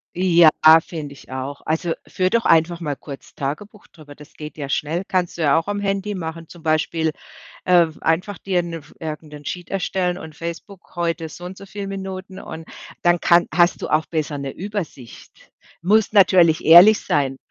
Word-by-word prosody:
Ja, 175 -3 +5 0.4
finde 150 -4 -7
ich 135 - -16
auch. 130 +2 -5
Also, 160 +2 -1
führe 185 0 -1
doch 230 0 +1
einfach 165 +1 +3
mal 145 -4 -3
kurz 140 -1 -11
Tagebuch 195 +10 -6
drüber, 145 -3 -15
das 150 0 -15
geht 150 0 -9
ja 140 -2 -5
schnell. 160 +6 -2
Kannst 180 -2 -1
du - - -2
ja 145 -3 +4
auch 165 +3 -1
am 205 0 -2
Handy 200 0 -2
mache. 165 -1 -6
Zum 170 -2 -15
Beispiel, 160 0 0 0.5
ähm, 170 -3 +3
einfach 180 +5 0
dir 185 -3 0
'ne 170 -1 -6
F 150 -1 -16
irgendein 150 -2 -8
Sheet 175 +1 -6
erstellen 180 -2 -1
und 160 -1 -10
„Facebook, 170 +4 -9
heute 165 -1 -2
so 165 +3 -12
und 185 +1 -8
so 200 - -11
viel 200 0 -7
Minuten" 190 -1 -7
und 160 0 -9 0.3
dann 175 -1 +3
kann 175 0 +4
hast 175 -1 +2
du - - -3
auch 155 +1 +2
besser 155 -2 -3
'ne 140 -1 -5
Übersicht. 185 - -8 0.3
Musst 210 +5 +2
natürlich 180 -5 +5
ehrlich 180 +7 +9
sein. 135 -2 0
170 Hz, 185 wpm, -21 LUFS, 155-185 Hz, 0.5 s, ehrlich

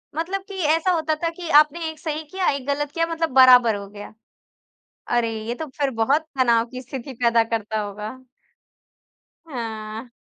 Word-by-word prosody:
मतलब 370 +5 -2
कि 400 - -9 0.2
ऐसा 350 +3 +1
होता 315 -2 0
था 335 - +2
कि 345 -2 -7
आपने 320 +2 +3
1 315 -1 -10
सही 315 -1 -4
किया, 375 -1 -1
1 275 -2 -4
गलत 290 0 -1
किया 330 +1 0
मतलब 330 -1 -1
बराबर 250 -4 +7
हो 200 0 -7
गया। 205 +1 -10 0.9
अरे! 235 -1 +1 0.2
ये 240 - -2
तो 315 +4 -6
फिर 280 -2 +1
बहुत 280 +8 +3 0.2
तनाव 235 -3 +4
की 255 +2 -8
स्थिति 265 +1 -7
पैदा 235 -1 +4
करता 220 -1 -2
होगा। 210 +5 -7 1.2
हाँ। 225 -3 -6
260 Hz, 170 wpm, -23 LUFS, 230-320 Hz, 1.2 s, बराबर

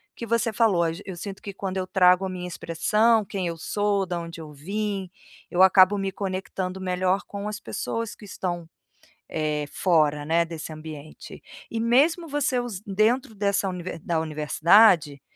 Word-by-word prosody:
que 235 - -6
você 230 0 +1
falou: 200 -6 +3
"Às 165 0 -2
eu 190 - -6
sinto 195 +2 -7
que 200 - -7
quando 190 0 -4
eu 185 0 -2
trago 180 0 +4
a - - -3
minha 180 -1 -5
expressão, 210 +8 +2
quem 190 -2 -3
eu 170 -1 -4
sou, 205 +3 0
da 175 -1 -3
onde 170 0 -8
eu 155 -1 -10
vim, 195 +5 -3 0.4
eu 180 +1 +5
acabo 190 +1 +6
me 195 -1 -2
conectando 190 -1 -4
melhor 185 +1 0
com 200 0 -5
as 210 - -5
pessoas 230 -1 -4
que 210 - -13
estão, 175 -3 -4 0.6
eh, 150 -1 -1
fora, 150 -5 +2
né, 165 +2 +3
desse 165 -1 -7
ambiente". 155 -1 -10 0.3
E 225 - -2
mesmo 295 +9 +3
você 280 -3 0
usa 225 -6 -6
dentro 220 +5 +1
dessa 200 -1 0
u - - -3 0.3
da 165 -2 0
universidade, 155 - +4
185 Hz, 170 wpm, -25 LUFS, 170-210 Hz, 0.6 s, acabo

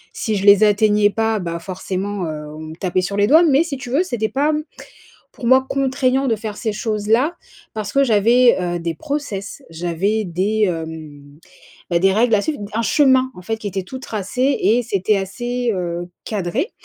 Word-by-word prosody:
Si 220 -3 -2
je 200 0 -2
les 200 0 +7
atteignais 210 0 +4
pas 225 +1 0
bah, 170 -2 -4
forcément, 190 +2 -4
heu, 150 -1 -5
on - - -9
me 155 0 -8
tapait 185 +1 -1
sur 200 +2 -3
les 205 - +4
doigts, 315 +7 +6
mais 300 -2 +4
si 300 -5 -5
tu 255 -2 -8
veux, 285 +8 +2
c'était 230 - -2
pas, 285 +6 +1
mmh, 305 0 -2 0.7
pour 240 - -7
moi 260 +2 +5
contraignant 265 0 +1
de 230 - +2
faire 210 -1 -6
ces 220 -1 -2
choses-là. 220 +8 0 0.4
Parce 210 -2 -4
que 275 0 +4
j'avais, 235 +2 +4
heu, 175 -1 -2
des 165 0 -3
process, 280 - -5
j'avais 175 +6 -1
des, 195 +5 -1
hem, 160 -5 -6 0.5
bah, 170 -1 +2
des 195 +2 +4
règles 225 +2 +3
à 205 - +2
suivre, 300 +6 -3
d 205 - -5
un 225 - 0
chemin 260 0 +3
en 180 - -10
fait 225 +5 -3
qui 220 - -6
était 190 0 -3
tout 260 +8 -8
tracé 250 +4 -1
et 240 +3 +3
c'était 205 -2 0
assez, 240 +5 -2
heu, 175 -1 -4 0.2
cadré. 215 - -2
210 Hz, 200 wpm, -19 LUFS, 185-250 Hz, 0.7 s, les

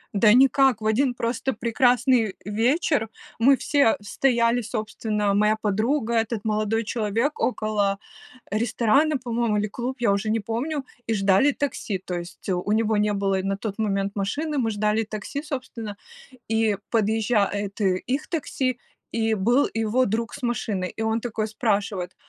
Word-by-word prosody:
Да 210 +1 +5
никак, 265 -1 +5
в - - -6
1 245 +4 +2
просто 240 +3 -1
прекрасный 235 -1 +2
вечер 230 - +1 0.3
мы 265 +4 +5
все 280 -6 +2
стояли, 235 +2 +1
собственно, 215 -2 -2
моя 210 +2 +3
подруга, 220 +4 0
этот 225 -1 -1
молодой 215 +1 0
человек 230 +5 -1
около 210 -4 0 0.5
ресторана, 240 +7 +2
по-моему, 235 -3 -1
или 205 - +1
клуб, 245 +5 -4
я 230 -4 +2
уже 200 +2 0
не 225 +1 +1
помню, 265 +7 -3 0.2
и 225 - +1
ждали 195 +7 +4
такси. 270 -8 -3
То 185 0 -7
есть, 175 +1 -11
э, - - 0
у 180 +3 -2
него 220 0 +2
не 210 0 +2
было 195 -1 0
и - - -3
на 195 0 -1
тот 205 0 -5
момент 200 -2 -1
машины, 285 +10 -2
мы 230 -3 +1
ждали 210 +1 +1
такси, 215 +6 -5
собственно, 250 -8 -6 0.5
и 220 -2 +1
подъезжает 210 -2 0
их 200 +9 0
такси, 265 -6 -2 0.3
и 225 -1 +1
был 235 +7 +3
его 225 +3 +1
друг 230 +2 -2
с 285 - -12
машиной. 215 -6 -1
И - - -5
он 220 +1 0
такой 220 -2 -2
спрашивает: 200 -5 -1
220 Hz, 155 wpm, -24 LUFS, 205-245 Hz, 0.5 s, Да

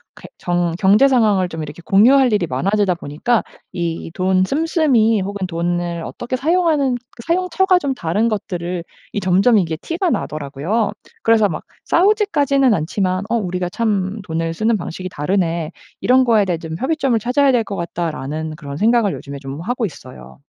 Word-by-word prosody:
이렇게 - - -12
정 175 -1 0
경제 210 +8 +5
상황을 210 -8 +2
좀 165 -1 -6
이렇게 155 +3 -8
공유할 240 +5 +5
일이 185 -5 +1
많아지다 190 +8 +1
보니까 170 +9 -1 0.3
이 170 -2 -3
돈 185 0 +2
씀씀이 275 - +2
혹은 200 0 -3
돈을 175 0 -2
어떻게 240 +8 -5
사용하는 305 -3 +2
그 240 -1 -12
사용처가 370 +2 +2
좀 280 -4 -1
다른 205 +3 0
것들을 180 -5 -3 0.3
이 - - -1
점점 195 +4 +4
이게 165 -3 -1
티가 340 - -2
나더라고요. 155 - -2 0.3
그래서 225 -2 +4
막 165 - -5 0.2
싸우지까지는 315 - +3
않지만 185 +2 -1
'어 235 - +1
우리가 180 -4 -2
참 205 -1 -1
돈을 165 -1 -2
쓰는 220 +4 +1
방식이 185 +1 -6
다르네. 165 0 -1 0.3
이런 260 +2 +4
거에 225 -5 +3
대해 175 -3 -1
좀 160 -1 -6
협의점을 270 -5 +1
찾아야 255 +5 +2
될 245 - +3
것 200 - -3
같다.'라는 160 -3 -4
그런 140 -1 -7
생각을 225 0 +3
요즘에 140 0 -7
좀 135 +1 -7
하고 245 +5 -2
있어요. 65 - -10
200 Hz, 370 characters per minute, -19 LUFS, 170-245 Hz, 0.3 s, 경제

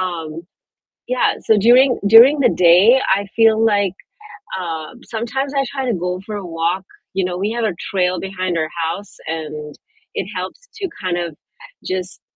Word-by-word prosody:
Um, 165 -3 -4 0.7
yeah, - - +1
so 220 - +2
during 245 +5 +5
during 245 +7 +8
the 245 - +5
day, 185 +9 +5 0.2
I 200 0 -3
feel 225 -1 +5
like, 205 -4 +2 0.7
uh, 165 +3 -5
sometimes 255 +5 -3
I 275 -1 +1
try 270 0 -4
to 240 - 0
go 180 0 -3
for 210 +1 -6
a 195 - -7
walk. 170 +2 -2 0.3
You 190 -1 0
know, 180 0 -3
we 205 +3 -1
have 235 -1 -1
a 195 - -1 0.2
trail 180 -2 +1
behind 185 -2 -3
our 155 -1 -1
house, 180 +5 -5
and 150 -2 -5 0.4
it 190 - -2
helps 185 - -6
to 410 -4 -3 0.2
kind 180 -1 -1
of 170 -3 -4 0.5
just, 185 0 -4
190 Hz, 170 wpm, -19 LUFS, 175-230 Hz, 0.7 s, during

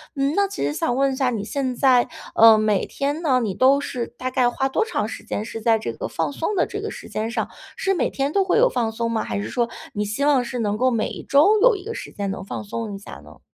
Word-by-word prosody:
嗯， 275 +1 0
那 400 0 +3
其 385 - -3
实 145 - -1
想 240 +10 -1
问 275 +1 +2
一 - - -3
下 260 -1 +1
你 220 -4 -3
现 260 +2 -2
在， 255 -1 +4 0.3
呃， 225 -1 +8
每 215 -3 +1
天 285 +3 -2
呢， 270 -6 +3
你 210 -4 -1
都 265 +6 +4
是 250 -4 -4
大 255 0 -3
概 250 -2 +3
花 270 +2 -1
多 270 - +1
长 445 - -2
时 - - -8
间 210 - -4
是 225 0 -7
在 225 0 +3
这 220 - -4
个 - - -5
放 - - -2
松 335 +8 -2
的 350 - +2
这 410 0 -6
个 435 - -4
时 - - -9
间 220 +1 -2
上， - - -2 0.3
是 390 0 +1
每 355 - 0
天 275 +2 -2
都 395 - +3
会 375 - +1
有 - - +6
放 230 - -1
松 230 +1 -2
吗？ 220 - 0
还 - - -3
是 205 - -4
说 235 -1 0 0.2
你 210 - -1
希 215 +7 -2
望 280 -4 +4
是 245 +1 -5
能 210 -2 0
够 255 +3 +3
每 225 -2 0
一 - - -8
周 360 +10 +4
有 - - +6
一 385 - -8
个 455 +3 -5
时 - - -7
间 200 -1 -4
能 190 - -6
放 - - -6
松 215 0 -5
一 - - -6
下 - - -10
呢？ - - -16
255 Hz, 305 characters per minute, -22 LUFS, 220-285 Hz, 0.3 s, 呃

